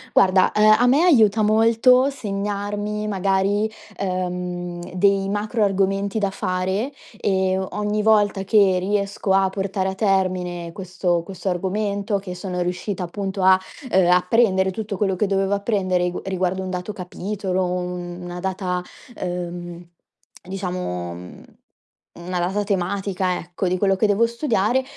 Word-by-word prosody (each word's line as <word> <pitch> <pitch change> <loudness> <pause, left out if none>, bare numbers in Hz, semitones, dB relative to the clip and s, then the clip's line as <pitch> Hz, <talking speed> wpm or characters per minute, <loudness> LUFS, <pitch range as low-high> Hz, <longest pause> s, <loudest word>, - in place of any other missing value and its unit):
Guarda, 185 -1 +5
ehm, 215 0 +6
a 245 - +4
me 280 +6 +4
aiuta 225 - +5
molto 230 +5 +4
segnarmi 205 -2 -3
magari, 195 +1 +1 0.3
uhm, 180 -2 -3
dei 195 +1 +2
macro 210 +2 -1
argomenti 195 +1 0
da 200 -2 0
fare 190 +6 -2 0.3
e 190 -1 +1
o 190 0 -2
ogni 210 0 -1
volta 205 -2 +3
che 195 -2 +4
riesco 200 +1 -1
a 195 0 +3
portare 195 0 -2
a 190 - -4
termine 185 -4 0
questo 180 -1 -1
questo 190 +1 -5
argomento, 200 +3 -1
che 190 -2 -6
sono 180 0 -4
riuscita 180 +2 -3
appunto 195 +2 -4
a, 185 0 +6 0.3
uhm, 185 -2 +4
apprendere 190 +1 +3
tutto 205 0 -5
quello 195 -1 +1
che 205 +3 0
dovevo 195 0 +1
apprendere 200 -3 0
ri 180 0 -3 0.2
riguardo 185 +1 0
un 185 - -5
dato 180 +2 -4
capitolo, 190 0 -3
u 180 0 -1 0.4
una 175 0 -6
data, 185 -1 -2 0.4
uhm, 175 -1 -5 0.6
diciamo, 180 - -4
mhmm, 90 +1 -11 0.7
una 180 +1 -4
data 190 +4 0
tematica 190 -1 -1
ecco 175 +2 -4
di 180 +1 +1
quello 195 0 +2
che 215 +3 +2
devo 205 +3 +3
studiare, 235 0 +1
190 Hz, 140 wpm, -22 LUFS, 180-205 Hz, 0.7 s, ehm